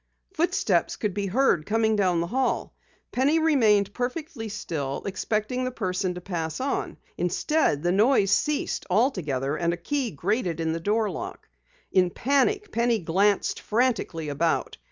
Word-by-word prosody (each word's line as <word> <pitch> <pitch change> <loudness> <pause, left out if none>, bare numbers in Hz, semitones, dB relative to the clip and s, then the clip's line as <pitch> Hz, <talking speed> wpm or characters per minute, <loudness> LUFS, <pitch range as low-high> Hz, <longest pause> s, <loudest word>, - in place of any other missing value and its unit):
Footsteps 355 +2 +1
could 210 -3 -2
be 200 0 -2
heard 205 - +2
coming 220 0 +2
down 180 -4 +2
the - - -1
hallway. 260 -2 0 0.4
Penny 275 +5 +2
remained 220 -11 +3
perfectly 250 -2 -4
still, 155 -10 -4
expecting 215 +5 -1
the 255 - 0
person 185 -6 -2
to 180 - -7
pass 165 -4 -4
on. 270 +2 -2 0.2
Instead, 180 - +1
the 175 - +2
noise 205 0 +3
ceased 300 +8 0
altogether 160 - +1
and 170 0 0
a - - -4
key 265 +8 -2
grated 175 - -1
in 160 -1 0
the 165 - -3
door 210 +4 0
lock. - - -7 0.4
In 180 -1 +4
panic, 285 - +1
Penny 235 0 +2
glanced 195 +3 +1
frantically 215 -9 0
about. 155 +3 0
205 Hz, 150 wpm, -26 LUFS, 175-255 Hz, 0.4 s, In